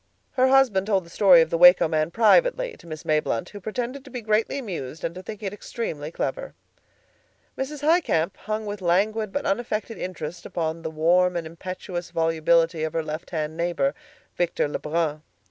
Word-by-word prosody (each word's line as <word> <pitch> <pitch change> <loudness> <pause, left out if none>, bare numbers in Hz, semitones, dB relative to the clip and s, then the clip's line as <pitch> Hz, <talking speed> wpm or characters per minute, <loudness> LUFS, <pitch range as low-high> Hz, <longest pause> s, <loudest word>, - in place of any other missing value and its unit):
Her 255 0 +3
husband 255 -8 +4
told 195 -4 +1
the 170 - -16
story 185 -4 +6
of 160 - 0
the 165 - 0
Waco 180 -1 +8
man 155 0 0
privately - - +3
to - - -17
Miss 155 -1 -7
Mayblunt, 150 -7 0
who 205 - -9
pretended 245 +6 -4
to 275 - -13
be 245 -2 -6
greatly 215 +4 +1
amused 170 - -6
and 165 - -2
to 185 - -8
think 215 +2 -9
it 195 -1 -3
extremely 160 -8 -5
clever. - - -4 1.0
Mrs. 280 +2 -5
Highcamp 290 - +2
hung 215 +1 -4
with 205 -1 -5
languid 205 +4 +1
but 285 - -3
unaffected 220 +1 -2
interest 175 -2 -6
upon 165 -1 -3
the 160 - -4
warm 175 +3 +2
and 170 -1 -2
impetuous 175 +1 -6
volubility 165 0 +2
of 160 - -2
her 165 - -1
left 155 +1 -6
hand 155 -2 -3
neighbor, 175 +11 0 0.4
Victor 175 -3 0
Lebrun. 150 +1 -2
180 Hz, 180 wpm, -24 LUFS, 165-220 Hz, 1.0 s, Waco